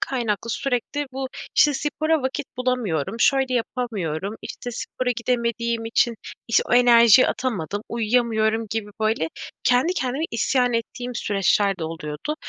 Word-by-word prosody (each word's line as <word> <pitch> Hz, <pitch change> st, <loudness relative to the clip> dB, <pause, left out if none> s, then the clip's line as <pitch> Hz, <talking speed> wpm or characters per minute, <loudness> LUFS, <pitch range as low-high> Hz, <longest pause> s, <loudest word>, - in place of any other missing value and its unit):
kaynaklı 230 Hz, -3 st, -2 dB
sürekli 275 Hz, +3 st, -2 dB
bu, 265 Hz, 0 st, -4 dB, 0.3 s
işte, 295 Hz, -2 st, +5 dB
spora 310 Hz, +1 st, 0 dB
vakit 265 Hz, +1 st, -2 dB
bulamıyorum. 230 Hz, -, -1 dB
Şöyle 265 Hz, -2 st, +3 dB
yapamıyorum. 215 Hz, -6 st, -3 dB
İşte, 245 Hz, -, -6 dB
spora 250 Hz, +1 st, -3 dB
gidemediğim 235 Hz, -1 st, -1 dB
için 230 Hz, +1 st, +1 dB, 0.3 s
iş 230 Hz, -, +4 dB
o -, -, +4 dB
enerjiyi 240 Hz, -1 st, +7 dB
atamadım. 205 Hz, -5 st, -2 dB
Uyuyamıyorum 225 Hz, -1 st, +1 dB
gibi, 215 Hz, -1 st, -3 dB
böyle, 215 Hz, -7 st, +1 dB, 0.4 s
kendi 255 Hz, +8 st, +3 dB
kendime 265 Hz, +1 st, -1 dB
isyan 245 Hz, +2 st, +1 dB
ettiğim 245 Hz, +2 st, -3 dB
süreçler 200 Hz, -2 st, +1 dB
de 165 Hz, -, -3 dB
oluyordu. 160 Hz, -, -5 dB
235 Hz, 130 wpm, -23 LUFS, 215-255 Hz, 0.4 s, enerjiyi